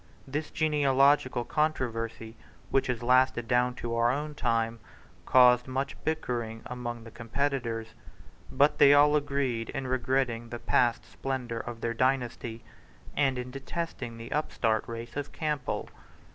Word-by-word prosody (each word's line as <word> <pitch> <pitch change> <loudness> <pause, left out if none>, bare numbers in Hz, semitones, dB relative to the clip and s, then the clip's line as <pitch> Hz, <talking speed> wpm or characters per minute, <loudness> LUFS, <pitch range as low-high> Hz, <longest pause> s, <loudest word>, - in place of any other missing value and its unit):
This 150 +3 -3
genealogical 140 -4 +3
controversy, 115 -6 -2 0.4
which 135 - +2
has 120 -2 -2
lasted 125 -1 +3
down 125 0 +2
to 120 -1 -4
our 115 0 +3
own 150 +3 -3
time, 115 -4 0 0.5
caused 125 -1 +6
much 135 +2 -2
bickering 120 -8 -2
among 120 -2 -5
the 115 - -11
competitors. 115 -2 -2 0.6
But 145 +2 +3
they 140 +1 +8
all 145 +1 +6
agreed 140 -5 -1
in 135 - -4
regretting 125 -2 0
the 120 - -5
past 120 0 +1
splendour 125 -4 -4
of 115 -1 -7
their 115 - -1
dynasty, 120 -2 -1 0.5
and 135 -3 +2
in 125 0 -5
detesting 135 -3 -5
the 115 0 -9
upstart 115 -7 0
race 115 0 -7
of 145 0 -4
Campbell. 150 -5 -2
125 Hz, 135 wpm, -29 LUFS, 115-140 Hz, 0.6 s, they